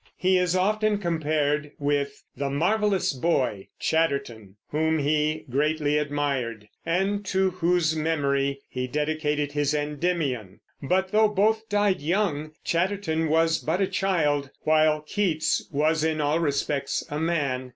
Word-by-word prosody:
He 185 Hz, 0 st, +3 dB
is 180 Hz, 0 st, +1 dB
often 210 Hz, +3 st, +2 dB
compared 150 Hz, -4 st, -1 dB
with 140 Hz, -1 st, -1 dB
"the 140 Hz, 0 st, -2 dB
marvelous 195 Hz, +6 st, +1 dB
boy" 130 Hz, -, 0 dB
Chatterton, 130 Hz, -11 st, -1 dB
whom 160 Hz, +1 st, +1 dB
he 155 Hz, +1 st, 0 dB
greatly 150 Hz, +2 st, +1 dB
admired, 140 Hz, -7 st, -2 dB, 0.2 s
and 195 Hz, +4 st, 0 dB
to 190 Hz, 0 st, +1 dB
whose 170 Hz, -2 st, +1 dB
memory 140 Hz, -3 st, 0 dB
he 125 Hz, 0 st, -4 dB
dedicated 150 Hz, 0 st, -1 dB
his 145 Hz, 0 st, 0 dB
Endymion; 145 Hz, -, -2 dB, 0.2 s
but 185 Hz, +6 st, 0 dB
though 215 Hz, +1 st, +5 dB
both 220 Hz, +2 st, +1 dB
died 205 Hz, -4 st, +1 dB
young, 155 Hz, -3 st, -1 dB
Chatterton 170 Hz, -3 st, 0 dB
was 165 Hz, +1 st, +3 dB
but 165 Hz, +4 st, -1 dB
a 195 Hz, -, +3 dB
child, 150 Hz, -8 st, 0 dB
while 155 Hz, -1 st, +3 dB
Keats 160 Hz, -1 st, 0 dB
was 155 Hz, +2 st, +1 dB
in 160 Hz, -1 st, 0 dB
all 150 Hz, +2 st, +1 dB
respects 140 Hz, -2 st, -1 dB
a 150 Hz, -, -2 dB
man. 140 Hz, -6 st, -1 dB
155 Hz, 130 wpm, -25 LUFS, 145-180 Hz, 0.2 s, though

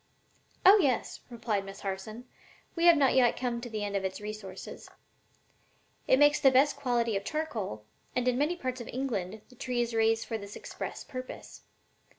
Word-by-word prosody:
"Oh 400 Hz, +3 st, +9 dB
yes," 265 Hz, -7 st, 0 dB
replied 225 Hz, -4 st, -2 dB
Miss 195 Hz, 0 st, -10 dB
Harson; 210 Hz, +5 st, -5 dB, 0.5 s
"we 335 Hz, 0 st, +1 dB
have 340 Hz, -2 st, +8 dB
not 275 Hz, -2 st, +4 dB
yet 250 Hz, -2 st, +4 dB
come 240 Hz, -2 st, -2 dB
to 245 Hz, -, -6 dB
the 215 Hz, -2 st, -3 dB
end 200 Hz, -1 st, -3 dB
of 195 Hz, -, 0 dB
its 190 Hz, 0 st, -3 dB
resources. 210 Hz, -3 st, -8 dB, 1.2 s
It 260 Hz, -, +5 dB
makes 290 Hz, +1 st, +5 dB
the 270 Hz, -, +6 dB
best 270 Hz, +3 st, +4 dB
quality 240 Hz, -5 st, 0 dB
of 195 Hz, -, -1 dB
charcoal, 215 Hz, -, -4 dB, 0.3 s
and 250 Hz, 0 st, 0 dB
in 250 Hz, -, +3 dB
many 295 Hz, +7 st, +1 dB
parts 255 Hz, -6 st, -4 dB
of 235 Hz, -, -8 dB
England 220 Hz, -6 st, -3 dB
the 250 Hz, -, -17 dB
tree 250 Hz, 0 st, -3 dB
is 235 Hz, -1 st, 0 dB
raised 225 Hz, 0 st, +2 dB
for 225 Hz, -2 st, -3 dB
this 200 Hz, 0 st, -9 dB
express -, -, -6 dB
purpose. 255 Hz, 0 st, -8 dB
240 Hz, 180 wpm, -30 LUFS, 210-265 Hz, 1.2 s, Oh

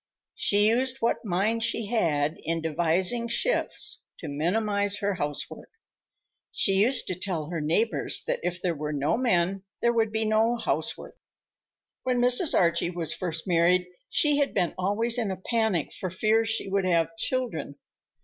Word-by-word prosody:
She 205 Hz, +1 st, +3 dB
used 255 Hz, +3 st, +1 dB
what 230 Hz, -, 0 dB
mind 210 Hz, +3 st, 0 dB
she 230 Hz, -1 st, 0 dB
had 160 Hz, -9 st, 0 dB
in 165 Hz, 0 st, -2 dB
devising 175 Hz, +8 st, +1 dB
shifts -, -, 0 dB
to 165 Hz, -, -8 dB
minimize 200 Hz, +7 st, 0 dB
her 200 Hz, 0 st, -1 dB
housework. 145 Hz, -5 st, -4 dB, 0.8 s
She 195 Hz, -, +2 dB
used 230 Hz, +6 st, +4 dB
to -, -, -3 dB
tell 175 Hz, -4 st, -4 dB
her 165 Hz, -3 st, -2 dB
neighbors 190 Hz, +9 st, +1 dB
that -, -, -1 dB
if 180 Hz, +1 st, -3 dB
there 175 Hz, -1 st, -1 dB
were 150 Hz, 0 st, -4 dB
no 145 Hz, +1 st, +1 dB
men, 195 Hz, -6 st, +1 dB, 0.2 s
there 235 Hz, 0 st, +2 dB
would 225 Hz, -2 st, +1 dB
be 220 Hz, 0 st, -1 dB
no 220 Hz, +2 st, +2 dB
housework. 240 Hz, -, -3 dB, 0.8 s
When 255 Hz, -1 st, 0 dB
Mrs. 250 Hz, +6 st, +3 dB
Archie 170 Hz, -1 st, +2 dB
was 170 Hz, -3 st, -3 dB
first 165 Hz, -3 st, -4 dB
married, 180 Hz, +1 st, +3 dB, 0.2 s
she 295 Hz, -2 st, +2 dB
had 285 Hz, -1 st, 0 dB
been 180 Hz, -4 st, +1 dB
always 225 Hz, +6 st, 0 dB
in 220 Hz, -4 st, -1 dB
a 190 Hz, -, -3 dB
panic 220 Hz, -, -1 dB
for 185 Hz, -, -4 dB
fear 215 Hz, +5 st, +2 dB
she 225 Hz, -2 st, -2 dB
would 195 Hz, 0 st, 0 dB
have 170 Hz, +3 st, +1 dB
children. 225 Hz, -, -2 dB
195 Hz, 160 wpm, -26 LUFS, 170-230 Hz, 0.8 s, used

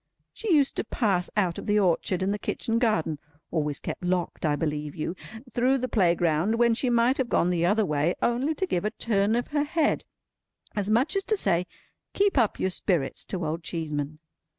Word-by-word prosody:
She 445 Hz, -4 st, -3 dB
used 290 Hz, -4 st, +3 dB
to -, -, 0 dB
pass 195 Hz, -7 st, 0 dB
out 180 Hz, -5 st, +1 dB
of -, -, -8 dB
the 205 Hz, 0 st, +3 dB
orchard 185 Hz, -1 st, +1 dB
and 195 Hz, +2 st, +1 dB
the 205 Hz, -, -3 dB
kitchen 230 Hz, +2 st, -1 dB
garden 165 Hz, -, +1 dB, 0.3 s
(always 150 Hz, -3 st, -1 dB
kept -, -, -6 dB
locked, 180 Hz, -2 st, -1 dB
I 145 Hz, -, +2 dB
believe 150 Hz, -1 st, -3 dB
you!) 165 Hz, +3 st, -3 dB, 0.4 s
through 255 Hz, +3 st, +2 dB
the 255 Hz, -1 st, -2 dB
playground, 175 Hz, -1 st, +2 dB
when 235 Hz, 0 st, +4 dB
she 250 Hz, +2 st, 0 dB
might 240 Hz, +3 st, +3 dB
have 255 Hz, -2 st, 0 dB
gone 175 Hz, -, +2 dB
the 170 Hz, -1 st, +1 dB
other 210 Hz, +3 st, +3 dB
way, 150 Hz, +2 st, +1 dB
only 255 Hz, +6 st, +1 dB
to 380 Hz, -, 0 dB
give 175 Hz, -, -1 dB
a 210 Hz, -, +1 dB
turn 215 Hz, -1 st, 0 dB
of 240 Hz, -, -1 dB
her 295 Hz, -1 st, +1 dB
head, 305 Hz, +1 st, +1 dB, 0.7 s
as 205 Hz, -1 st, 0 dB
much 250 Hz, -, +2 dB
as 390 Hz, -, +1 dB
to 430 Hz, -, +1 dB
say 180 Hz, -, +1 dB, 0.5 s
"Keep 400 Hz, 0 st, +2 dB
up 235 Hz, -6 st, +2 dB
your 190 Hz, -, 0 dB
spirits!" 175 Hz, -6 st, -1 dB
to 180 Hz, -4 st, -3 dB
Old 160 Hz, +2 st, -2 dB
Cheeseman. 155 Hz, -3 st, -4 dB
200 Hz, 200 wpm, -26 LUFS, 170-240 Hz, 0.7 s, when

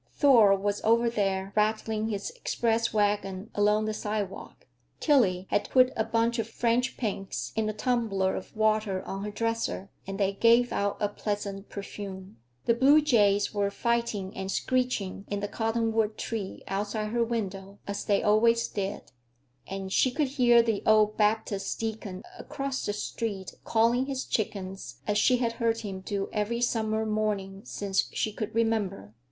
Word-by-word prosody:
Thor 230 Hz, -9 st, +6 dB
was 205 Hz, +1 st, -1 dB
over 230 Hz, +1 st, +3 dB
there, 195 Hz, -3 st, -1 dB
rattling 215 Hz, 0 st, +1 dB
his 205 Hz, -, -3 dB
express 230 Hz, -, 0 dB
wagon 205 Hz, -1 st, 0 dB
along 210 Hz, +1 st, +2 dB
the 215 Hz, -, -1 dB
sidewalk. 210 Hz, -2 st, -5 dB, 0.3 s
Tillie 200 Hz, -, +3 dB
had -, -, +1 dB
put 255 Hz, 0 st, +5 dB
a 220 Hz, -, +1 dB
bunch 230 Hz, +1 st, 0 dB
of 225 Hz, 0 st, -2 dB
French 240 Hz, +2 st, 0 dB
pinks 195 Hz, -4 st, -3 dB
in 220 Hz, -1 st, 0 dB
a -, -, -2 dB
tumbler 210 Hz, -5 st, 0 dB
of -, -, -8 dB
water 215 Hz, -3 st, +1 dB
on 195 Hz, +1 st, -5 dB
her 210 Hz, -, -3 dB
dresser, 230 Hz, -2 st, -2 dB, 0.2 s
and 195 Hz, +1 st, -5 dB
they 200 Hz, -1 st, +2 dB
gave 235 Hz, +4 st, +4 dB
out 200 Hz, 0 st, 0 dB
a 205 Hz, -, +1 dB
pleasant 205 Hz, -1 st, -4 dB
perfume. 195 Hz, -, -8 dB, 0.3 s
The 235 Hz, -, +4 dB
blue 270 Hz, +6 st, +6 dB
jays 205 Hz, -8 st, +3 dB
were 200 Hz, -1 st, +1 dB
fighting 225 Hz, -3 st, -1 dB
and 190 Hz, 0 st, -4 dB
screeching 250 Hz, -7 st, -1 dB
in 205 Hz, -, -2 dB
the 205 Hz, -, -2 dB
cottonwood 225 Hz, 0 st, 0 dB
tree 215 Hz, -4 st, -4 dB
outside 210 Hz, +2 st, -2 dB
her 235 Hz, +1 st, +1 dB
window, 200 Hz, -4 st, -4 dB
as 200 Hz, 0 st, -4 dB
they 200 Hz, -1 st, +1 dB
always 230 Hz, +2 st, +4 dB
did, 200 Hz, -1 st, -4 dB, 0.6 s
and 195 Hz, 0 st, -5 dB
she 260 Hz, -, +4 dB
could 280 Hz, +2 st, 0 dB
hear 240 Hz, -3 st, +5 dB
the 225 Hz, -3 st, 0 dB
old 215 Hz, -1 st, +4 dB
Baptist 210 Hz, -2 st, 0 dB
deacon 220 Hz, -4 st, -4 dB, 0.2 s
across 275 Hz, -1 st, -4 dB
the 205 Hz, -, 0 dB
street 205 Hz, -2 st, -4 dB
calling 235 Hz, +3 st, +2 dB
his 270 Hz, -2 st, -3 dB
chickens, 195 Hz, -3 st, -3 dB
as 210 Hz, 0 st, +1 dB
she 250 Hz, +3 st, +4 dB
had 235 Hz, -2 st, 0 dB
heard 230 Hz, -1 st, 0 dB
him 195 Hz, -3 st, -5 dB
do 195 Hz, +1 st, -3 dB
every 215 Hz, +2 st, -1 dB
summer 220 Hz, -2 st, 0 dB
morning 210 Hz, -3 st, -2 dB
since 195 Hz, -1 st, -1 dB
she 215 Hz, -, -1 dB
could 215 Hz, +1 st, -5 dB
remember. 215 Hz, -, 0 dB
215 Hz, 160 wpm, -28 LUFS, 200-230 Hz, 0.6 s, Thor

